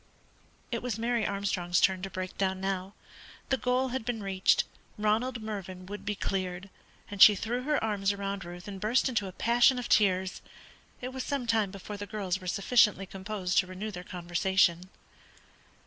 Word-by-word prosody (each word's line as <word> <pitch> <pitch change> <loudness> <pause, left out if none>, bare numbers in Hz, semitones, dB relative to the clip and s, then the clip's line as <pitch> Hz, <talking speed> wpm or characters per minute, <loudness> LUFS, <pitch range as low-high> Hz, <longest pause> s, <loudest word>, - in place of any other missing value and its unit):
It 235 - -2
was 240 -4 -3
Mary 235 0 0
Armstrong's 185 -3 0
turn 190 -1 +3
to 195 - -4
break 185 -1 -5
down 190 -1 0
now. 190 0 -3 0.5
The 265 - +2
goal 250 +2 +1
had 255 -1 -3
been 230 -2 -3
reached, 190 -1 +3 0.3
Ronald 220 +3 0
Mervyn 190 -4 -6
would 200 +1 -8
be 210 0 -1
cleared; 190 -1 -3 0.4
and 200 -2 -4
she 210 - +10
threw 235 +5 -2
her 300 0 +2
arms 205 -2 +1
round 200 -1 -4
Ruth 175 +2 -9
and 195 -2 -7
burst 230 +6 +2
into 220 -6 -1
a - - -6
passion 240 +6 +4
of 245 - -3
tears. 190 -3 +2 0.6
It 250 - -3
was 260 -1 -3
some 280 -3 -2
time 220 -4 +2
before 200 +2 -8
the 205 0 -6
girls 190 -3 -2
were 185 - -8
sufficiently 205 0 +3
composed 190 -1 -1
to 185 - 0
renew 190 +4 -5
the 180 -2 -7
conversation. 180 0 +1
200 Hz, 180 wpm, -29 LUFS, 185-225 Hz, 0.6 s, she